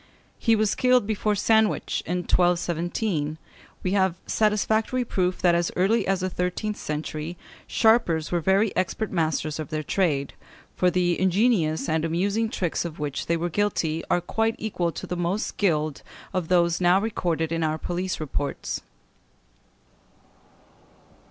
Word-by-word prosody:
He 225 -2 +3
was 215 -1 +2
killed 250 -3 +3
before 210 0 0
Sandwich, 220 +1 +2
in 180 +2 -1
1217. 175 -2 0 0.5
We 185 - 0
have 190 -3 +2
satisfactory 220 +3 +1
proof 185 -4 -1
that 175 -1 +5
as 170 0 +1
early 200 +4 +2
as 195 -1 +1
the 185 - -1
thirteenth 180 +5 -2
century 155 +2 -4 0.3
sharpers 220 -9 +2
were 175 - +2
very 195 +5 +2
expert 190 +4 -1
masters 160 -3 -1
of 155 - -5
their 155 -1 -3
trade, 145 -7 0 0.4
for 180 - +3
the 175 -1 +1
ingenious 185 -4 +2
and 160 0 0
amusing 200 +7 0
tricks 180 -7 -1
of 170 -2 -6
which 145 -2 -4
they 170 - +2
were 170 +1 -1
guilty 170 -4 0
are 175 - +2
quite 225 +4 0
equal 180 -6 -2
to - - -7
the 180 - -4
most 175 +4 -1
skilled 155 -7 0 0.3
of 185 -3 -1
those 170 -1 +2
now 180 +2 +5
recorded 170 -7 -1
in 165 0 -1
our 155 0 0
police 180 +3 -3
reports. 145 -2 -3
180 Hz, 145 wpm, -25 LUFS, 165-205 Hz, 0.5 s, that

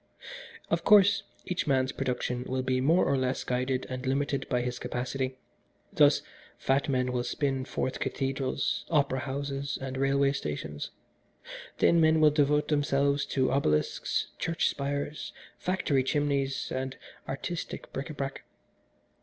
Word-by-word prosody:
Of - - +1
course, 200 -1 +6 0.2
each 180 - -2
man's 130 -2 +2
production 125 -2 -2
will 130 0 -1
be 130 0 +1
more 165 +7 +4
or - - +2
less 130 0 -1
guided 125 +1 -1
and 130 0 -5
limited 135 +1 -1
by 125 -1 +1
his 125 0 -3
capacity. 130 +1 -3 0.6
Thus, - - +5 0.3
fat 135 +2 +1
men 125 -1 +1
will 125 -1 0
spin 135 -1 -1
forth 130 0 -2
cathedrals, 135 0 -1
opera 140 -4 +2
houses 140 +1 -3
and 130 0 -5
railway 135 +1 +3
stations. 75 - -4 0.9
Thin 170 -1 +4
men 160 0 +5
will 155 -1 +6
devote 150 0 +2
themselves 140 -1 +2
to 130 -2 +1
obelisks, 75 - 0
church 165 0 +1
spires, 145 +1 -3 0.3
factory 175 -7 +1
chimneys, 140 -1 0
and 130 0 -3 0.3
artistic 165 +5 -5
bric 135 +4 -4
a 155 - -6
brac. 135 -1 -4
135 Hz, 135 wpm, -29 LUFS, 130-145 Hz, 0.9 s, course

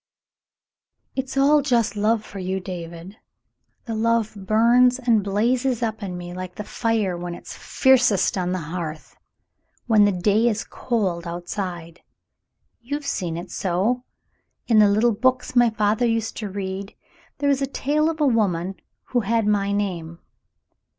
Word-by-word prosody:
It's 265 0 -4
all 290 +2 +5
just 235 -6 +1
love 215 +1 +1
for 200 - -9
you, 190 +1 -2
David. 175 +1 -8 0.7
The 230 - -4
love 225 0 +1
burns 235 +5 +4
and 235 -5 +2
blazes 240 +5 0
up 220 -1 -2
in 185 -3 -5
me 175 0 -7
like 180 0 -7
the 210 - -5
fire 215 -4 -1
when 175 0 -5
it's - - -10
fiercest 250 -7 +3
on 180 -2 -1
the 185 - -1 0.2
hearth, 160 -3 -6 0.7
when 215 -3 +5
the 205 - +3
day 205 +5 +2
is 215 -1 -2
cold 190 -8 -2
outside. 175 -1 -5 0.8
You've 285 +4 -4
seen 175 -11 -2
it 175 +1 -7
so. 200 +7 0 0.6
In 225 -3 +4
the 210 -1 +6
little 220 +3 +3
books 255 +4 0
my 240 -1 +6
father 215 +2 +1
used 225 -1 -1
to 210 -2 -4
read, 195 0 -5 0.4
there 285 0 0
was 275 -1 +2
a 275 - 0
tale 300 +3 0
of 325 -1 -4
a 300 - +3
woman 195 -7 +1 0.3
who 245 - +2
had 225 0 +1
my 200 -1 +1
name. 175 -5 -3
210 Hz, 155 wpm, -23 LUFS, 185-240 Hz, 0.8 s, the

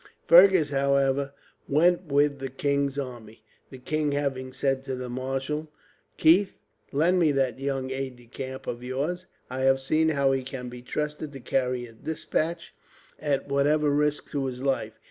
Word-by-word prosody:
Fergus, 175 -3 +7
however, 140 0 +2 0.4
went 175 +5 +3
with 145 0 +2
the 135 0 -4
king's 140 +1 -1
army, 120 -5 -7 0.3
the 130 - -10
king 150 +3 -1
having 135 -2 -2
said 135 +1 0
to 135 -1 -3
the 125 -1 -6
Marshal: 135 +5 -3 0.5
"Keith, 185 +5 +4 0.4
lend 170 +6 +3
me 160 -4 +4
that 130 -3 0
young 135 -1 -2
aide 135 -1 -4
de 120 0 -18
camp 130 +2 -7
of 120 0 -4
yours. 150 +9 -3 0.2
I 130 - -4
have 135 0 +3
seen 155 +4 +2
how 140 -3 +2
he 135 0 +1
can 125 -1 -6
be 120 0 -9
trusted 150 +3 -4
to 135 - -8
carry 125 0 -1
a 115 - -14
despatch, 160 +5 -3 0.5
at 145 -3 -1
whatever 145 +2 +2
risk 150 +1 0
to 140 -2 -1
his 125 0 -6
life. 130 -5 0
140 Hz, 165 wpm, -26 LUFS, 130-150 Hz, 0.5 s, Fergus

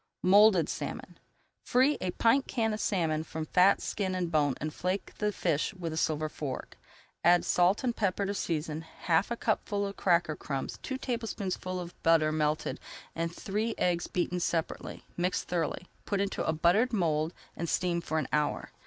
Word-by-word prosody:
MOULDED 195 -2 +6
SALMON - - -5 0.4
Free 260 +4 +3
a 185 - -1
pint 230 +8 +3
can 225 -3 0
of 215 - -3
salmon 160 -7 0
from 160 0 -5
fat, 180 +4 +4
skin, 190 -3 -2
and 175 -2 -2
bone 145 -4 +2
and 155 0 -3
flake 185 +2 -2
the 210 0 +1
fish 170 0 -1
with 170 -3 -4
a - - -4
silver 155 -1 0
fork. 145 -3 -6 0.4
Add 175 +1 +5
salt 180 +6 +3
and 240 -2 0
pepper 200 -1 0
to 200 - -1
season, 160 -4 -2
half 165 +2 0
a 235 - -2
cupful 205 -3 0
of 200 0 -6
cracker 170 -4 +2
crumbs, 135 -3 -4
two 265 - -3
tablespoonfuls 205 -7 -3
of 175 - -13
butter 160 -2 +4
melted, 155 0 0 0.4
and 165 0 -1
three 215 +5 -2
eggs 175 -1 +1
beaten 180 0 -1
separately, 170 -1 -3
mix 180 +1 0
thoroughly, 175 0 -2 0.2
put 200 - -1
into 200 0 -1
a - - +3
buttered 180 +10 +3
mould 160 -5 +1 0.2
and 170 -1 -3
steam 175 -2 +1
for 160 -1 -2
an 155 -4 0
hour. 150 -1 0
175 Hz, 175 wpm, -30 LUFS, 160-200 Hz, 0.4 s, MOULDED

